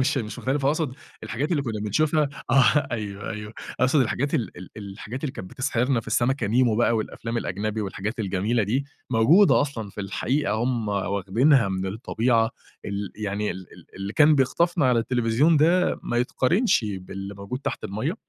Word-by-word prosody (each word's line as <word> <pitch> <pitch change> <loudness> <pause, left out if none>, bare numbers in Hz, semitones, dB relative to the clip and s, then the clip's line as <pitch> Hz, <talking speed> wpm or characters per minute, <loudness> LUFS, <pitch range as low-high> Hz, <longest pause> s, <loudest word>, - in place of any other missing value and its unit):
مش 135 +2 +1
مش 110 -4 -5
مختلِفة، 135 +1 0
أقصُد 150 -3 -1 0.3
الحاجات 115 +8 -3
اللي 145 -4 +1
كنّا 110 -5 -4
بنشوفها، 150 +7 +1 0.2
آه 135 +2 +4
أيوه، 105 -3 -4
أيوه، 105 0 -6 0.3
أقصُد 130 +3 +4
الحاجات 135 +3 0
ال 115 - -2
ال 90 +1 -10
الحاجات 105 +6 -7
اللي 135 - -2
كانت 90 - -8
بتسحِرنا 130 -1 0
في - - -17
السمكة 120 +2 +1
نِيمو 115 0 +3
بقى 115 0 +3
والأفلام 115 +2 -4
الأجنبي 110 0 -2
والحاجات 105 +3 -4
الجميلة 105 +4 0
دي، 125 +8 0 0.3
موجودة 150 - +5
أصلًا 120 -8 -3
في 105 - -7
الحقيقة، 125 +8 -1
هُم 115 -1 -1
واخدينها 100 +6 +2
من 95 0 -2
الطبيعة 115 +2 +1 0.3
ال 100 -1 -4
يعني 105 0 -2
ال 95 -1 -8
ال - - -15
اللي 100 +1 -5
كان 155 +3 +6
بيخطَفنا 150 +3 +2
على 125 -2 +3
التليفزيون 120 +6 +2
ده 170 +5 +3
ما 120 - -2
يتقارنش 130 - +2
باللي 95 0 -6
موجود 100 +6 -6
تحت - - -4
المَيَّة. 110 - -2
115 Hz, 170 wpm, -25 LUFS, 105-135 Hz, 0.3 s, كان